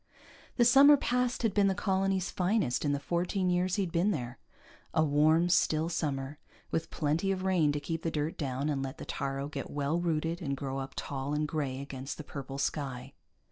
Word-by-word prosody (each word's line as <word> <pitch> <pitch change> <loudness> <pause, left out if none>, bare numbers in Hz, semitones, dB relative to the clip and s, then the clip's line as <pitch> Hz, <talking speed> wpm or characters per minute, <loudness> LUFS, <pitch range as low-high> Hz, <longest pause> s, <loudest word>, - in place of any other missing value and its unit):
The 240 - +5
summer 275 +4 +8
past 250 -2 0
had 220 -4 +2
been 200 -1 +4
the 190 - +1
colony's 195 -1 0
finest 180 - +1
in 145 - +1
the 145 - 0
fourteen 180 +5 0
years 180 +1 +1
he'd 190 -4 -1
been 170 +5 +2
there, 125 -9 -3 0.6
a 160 - +4
warm, 155 +3 +4
still 160 -2 +2
summer 145 -3 -3 0.3
with 160 - -1
plenty 160 +6 0
of 185 -1 -2
rain 180 -6 +3
to 145 - -2
keep 165 +2 -4
the 165 - -1
dirt 155 0 -2
down 135 -1 -2
and 145 -3 -1
let 135 -1 -5
the - - -8
taaro 140 0 -3
get 150 - -6
well 145 +3 -1
rooted 165 0 -1
and 140 -4 -2
grow 135 0 -3
up 135 0 -6
tall 140 +1 -3
and 150 0 0
gray 140 -4 -2
against 135 0 -6
the 155 - -7
purple 135 -1 -7
sky. 135 -2 -3
155 Hz, 200 wpm, -30 LUFS, 140-185 Hz, 0.6 s, summer